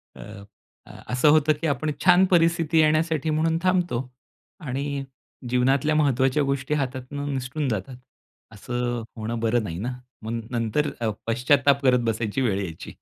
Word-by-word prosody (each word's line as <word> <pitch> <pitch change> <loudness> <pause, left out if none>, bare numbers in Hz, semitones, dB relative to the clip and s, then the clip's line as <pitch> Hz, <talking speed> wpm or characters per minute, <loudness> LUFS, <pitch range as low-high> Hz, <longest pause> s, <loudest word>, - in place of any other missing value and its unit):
अ, - - -11 0.6
अ, - - -13
असं 125 +4 +4
होतं 155 0 +4
की 165 - 0
आपण 150 +1 -1
छान 180 +1 +6
परिस्थिती 165 -1 +3
येण्यासाठी 155 0 +2
म्हणून 160 +1 +1
थांबतो 180 -8 +1 0.7
आणि 140 +1 -3 0.5
जीवनातल्या 135 +4 +2
महत्वाच्या 140 -1 +2
गोष्टी 140 +1 -1
हातातनं 140 +1 -3
निसटून 130 +2 -3
जातात. 115 +4 -4 0.5
असं 120 +2 -3
होणं 115 +2 -3
बरं 115 +1 +1
नाही 85 -5 -5
ना, 120 +4 -3 0.3
मग 115 +1 -4
नंतर 120 +5 0
अ, 115 - +1 0.2
पश्चात्ताप 140 +4 +3
करत 125 -1 +4
बसायची 110 +3 -2
वेळ 100 -6 +1
यायची. 85 -3 -8
135 Hz, 145 wpm, -24 LUFS, 120-155 Hz, 0.7 s, छान